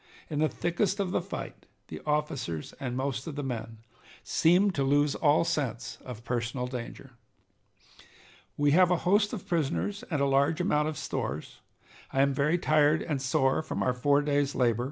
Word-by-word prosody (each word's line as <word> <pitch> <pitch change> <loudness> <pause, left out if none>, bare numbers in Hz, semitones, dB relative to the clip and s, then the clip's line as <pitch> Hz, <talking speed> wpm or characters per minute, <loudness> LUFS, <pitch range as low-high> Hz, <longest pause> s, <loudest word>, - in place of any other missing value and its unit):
In 150 - -1
the 155 0 +3
thickest 190 +3 -1
of 190 -2 -1
the - - +1
fight - - -7 0.2
the - - -7
officers 150 - -2
and 125 -2 -3
most 135 0 -2
of 155 - -5
the 145 - -3
men 115 -3 -5 0.5
seemed 180 +4 +3
to 140 -4 0
lose 145 +1 +3
all 150 +1 +3
sense 135 -8 -3
of 120 -3 -8
personal 120 +1 -2
danger. 125 +1 -7 1.5
"We 145 0 +3
have 180 +3 +5
a 180 - +4
host 205 +3 +3
of 200 -4 -6
prisoners 175 - -1
and 155 -5 -1
a 140 - +2
large 140 +4 +2
amount 150 -5 +1
of 155 - -4
stores. 75 +4 -4 0.5
I 135 - +2
am 140 0 +2
very 150 +5 +2
tired 155 -2 +3
and 145 -5 -2
sore 135 +1 +2
from - - -3
our 125 - +1
four 140 +3 +2
days' 145 -1 0
labor. 120 -3 +2
145 Hz, 175 wpm, -29 LUFS, 130-165 Hz, 1.5 s, have